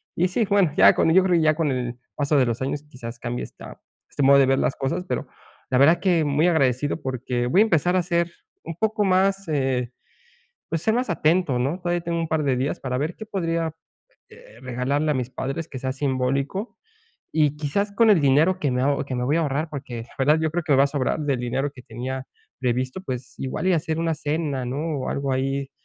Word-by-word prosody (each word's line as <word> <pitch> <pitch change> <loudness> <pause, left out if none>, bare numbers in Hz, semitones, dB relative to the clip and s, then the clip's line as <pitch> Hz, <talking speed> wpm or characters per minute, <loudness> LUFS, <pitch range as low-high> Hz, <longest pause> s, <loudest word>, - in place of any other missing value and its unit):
y 180 - +2
sí, 220 +5 +1
bueno, 200 -6 +3
ya - - +8
con 160 - +3
yo 190 - +7
creo 185 -2 +2
que - - +2
ya 155 0 +4
con 160 -2 0
el 125 -2 -3 0.2
paso 145 +1 0
de 130 - +4
los 115 +1 -2
años, 140 +2 -2
quizás 115 -3 -9
cambie 120 +1 -4
esta - - -11 0.3
este 140 - -2
modo 140 +1 +7
de 135 - +5
ver 135 0 +3
las - - 0
cosas. 135 +7 -2
Pero - - -3 0.4
la 130 - +2
verdad 155 +5 +6
que, 175 -4 +2
muy 145 +4 +2
agradecido, 145 -3 +1
porque, 125 -2 -2
voy 180 +11 +4
a - - +8
empezar 180 -3 +2
a 185 - +3
ser 170 0 0 0.3
un 165 - -6
poco 220 +3 0
más, 195 +1 +2
eh, 130 -4 0 0.8
pues, 165 -1 -1
ser 220 - +2
más 245 -3 -1
atento, 165 -4 +2
¿no? 140 +8 -1
Todavía 175 0 -1
tengo 170 0 -2
un 165 - -2
par 160 -1 0
de 135 -2 +1
días 135 +4 -2
para 125 -1 -2
ver 155 +5 -2
qué 220 - -8
podría, 165 -5 -1 0.6
este, 110 - -16
regalarle 130 +4 -1
a - - +2
mis 125 -1 -2
padres, 145 +5 -4
que 130 - -7
sea 130 +1 -2
simbólico. 135 - -2 0.6
Y, 150 -2 +2
quizás, 155 +8 -1
con 225 +2 +4
el 195 -6 +5
dinero 150 +7 +3
que 145 - +1
me 125 0 0
aho 140 +1 +1
que 135 - -5
me 125 - -1
voy 145 +5 +1
a - - +2
ahorrar, 150 +1 -1
porque 130 -5 -6
la 115 - -16
verdad, 150 +4 +3
yo 160 -1 0
creo 175 +2 -1
que 150 - +1
me 135 - +4
va 135 - +6
a - - 0
sobrar 140 +1 -1
del 140 -4 -1
dinero 130 +4 -1
que 125 - -13
tenía 130 +3 -5 0.3
previsto, 130 +6 -1
pues, 130 -5 -6
igual 135 +7 -3
y - - +4
hacer 160 0 -1
una 165 -1 0
cena, 145 -3 -2
¿no?, 145 +3 -2
o - - -3
algo 140 -1 -2
ahí 135 +1 -1
145 Hz, 235 wpm, -23 LUFS, 130-165 Hz, 0.8 s, ya